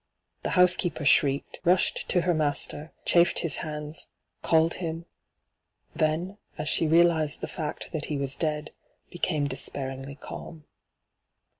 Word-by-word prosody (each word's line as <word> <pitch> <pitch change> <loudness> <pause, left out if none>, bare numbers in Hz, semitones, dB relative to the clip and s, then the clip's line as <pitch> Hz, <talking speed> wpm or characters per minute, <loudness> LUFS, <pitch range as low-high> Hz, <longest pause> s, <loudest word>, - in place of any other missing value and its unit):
The - - -3
housekeeper 175 -3 +3
shrieked, 140 -1 +3
rushed 180 +1 +2
to 180 - +3
her 175 0 +1
master, 150 0 0
chafed 170 0 +4
his 165 -4 0
hands, 150 0 -5 0.3
called 160 +1 +3
him; 165 -1 -4 0.9
then, 170 +6 -1 0.2
as 150 - -4
she 165 - +2
reaUzed 160 -2 +3
the - - -2
&ct 155 -3 -5
t^t 155 -3 -3
he 150 - -2
was 140 0 0
dead, 155 -1 -2 0.4
became 160 -4 0
despairingly 135 0 -3
calm. 155 +2 -9
155 Hz, 130 wpm, -27 LUFS, 145-170 Hz, 0.9 s, chafed